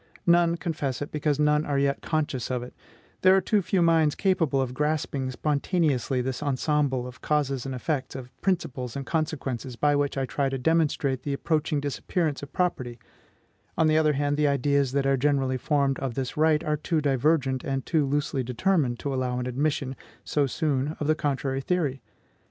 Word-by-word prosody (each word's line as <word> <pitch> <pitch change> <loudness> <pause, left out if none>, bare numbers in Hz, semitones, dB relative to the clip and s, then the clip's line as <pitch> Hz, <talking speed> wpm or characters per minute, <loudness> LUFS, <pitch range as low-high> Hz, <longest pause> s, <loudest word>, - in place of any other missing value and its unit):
None 170 -1 +4
confess 145 -8 -3
it, 145 - -8
because 150 -1 0
none 150 0 +3
are 145 -3 -1
yet 140 0 +1
conscious 150 -6 -2
of 125 -1 -2
it; 125 - -10 0.5
there 185 0 +6
are - - +5
too 205 +2 +1
few 185 -1 +1
minds 160 -3 +3
capable 175 -8 +1
of 130 -2 -1
grasping 145 -2 -1
spontaneously 140 - 0
this 130 0 -3
ensemble 140 -2 0
of 125 0 -10
causes 140 -3 0
and 135 - -4
effects, 135 +1 -3
of 125 -1 -8
principles 140 -10 -1
and 140 -1 -4
consequences, 135 -6 -2
by 145 +5 +2
which 145 -1 0
I 135 - 0
try 135 +2 -1
to 135 - -2
demonstrate 145 -2 +1
the 140 +1 -3
approaching 155 +1 0
disappearance 145 +2 -2
of 145 - -9
property; 130 -10 -1 0.8
on 160 - +4
the 155 0 +4
other 155 -1 +3
hand, 145 +1 0
the 150 -1 +3
ideas 140 -1 +2
that 140 -1 +1
are 135 0 +3
generally 135 -1 +1
formed 140 0 +1
of 130 -4 -3
this 130 -2 -3
right 155 0 +3
are 150 0 0
too 155 +2 0
divergent 140 -1 +1
and 135 -1 -2
too 160 -4 +2
loosely 140 0 -1
determined 130 0 0
to 140 - -2
allow 130 -1 -1
an 125 - -2
admission, 135 +1 -1 0.3
so 145 -2 +1
soon, 145 +1 -1
of 150 - -2
the 155 - +4
contrary 135 -3 -1
theory. 145 -5 -1
145 Hz, 185 wpm, -26 LUFS, 130-155 Hz, 0.8 s, there